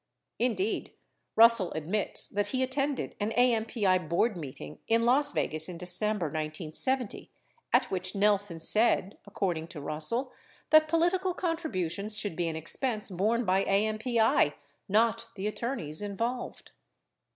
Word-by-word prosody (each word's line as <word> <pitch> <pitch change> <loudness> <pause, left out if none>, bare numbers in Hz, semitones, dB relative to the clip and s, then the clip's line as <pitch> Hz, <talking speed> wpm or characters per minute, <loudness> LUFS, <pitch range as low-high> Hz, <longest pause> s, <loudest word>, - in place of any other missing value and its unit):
Indeed, 220 -4 -1 0.4
Russell 230 -5 +6
admits 170 +7 -3
that 205 0 -1
he 260 -1 -1
at 260 - -3
tended 275 0 -1
an 205 +1 -1
AMPI 220 -8 +1
board 210 +6 +1
meeting 130 - -8
in 230 +1 +2
Las 280 +4 +4
Vegas 155 +2 -1
in 175 - -7
December 180 +2 0
1970, 155 - -2 0.4
at - - +2
which 185 0 -2
Nelson 200 -3 +2
said, 200 +2 +3
according 175 -5 -2
to 165 - -9
Russell, 155 - -1 0.4
that 310 0 +6
political 350 +3 +1
contributions 215 - -2
should 205 -5 -2
be 175 0 -1
an 160 - -3
expense 215 - -1
borne 220 +6 0
by 190 +1 +2
AMPI, 215 - +2 0.4
not 230 +2 +2
the 195 0 -5
attorneys 210 - -3
involved. 230 +5 -4
210 Hz, 130 wpm, -29 LUFS, 175-240 Hz, 0.4 s, Russell